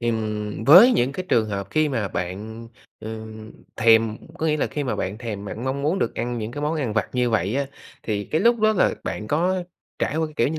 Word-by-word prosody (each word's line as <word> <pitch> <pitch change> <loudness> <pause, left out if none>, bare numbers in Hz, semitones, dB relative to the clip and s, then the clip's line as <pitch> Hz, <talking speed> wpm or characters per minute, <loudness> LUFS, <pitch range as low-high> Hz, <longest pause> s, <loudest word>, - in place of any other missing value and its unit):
ừm, 110 -2 -2
với 190 - +9
những 125 +3 +1
cái 185 - -5
trường 110 -2 +2
hợp 100 -1 -4
khi 155 -1 +2
mà 115 -7 -1
bạn, 110 +7 -5 0.3
ừm, 110 0 -8 0.2
thèm 115 -1 +4 0.2
có 160 - 0
nghĩa 155 -1 +2
là - - 0
khi 145 -1 -4
mà 125 - -2
bạn 100 +4 -3
thèm 105 -5 -5
bạn 110 +4 -6
mong 135 +1 -2
muốn 165 +6 +1
được - - -1
ăn 120 0 -3
những 110 0 -4
cái 145 - -5
món 155 +2 0
ăn 135 -8 -2
vặt 110 -3 0
như 125 -1 +1
vậy 105 +1 0
á, 140 0 0 0.4
thì 105 -2 -2
cái 155 - -1
lúc 235 -1 +3
đó 215 0 +4
là 195 - +2
bạn 105 - -4
có 180 +4 +1 0.4
trải 150 - -1
qua 160 0 +1
cái, 155 - -13
kiểu 120 - +2
như 160 - -3
120 Hz, 245 wpm, -23 LUFS, 110-150 Hz, 0.4 s, với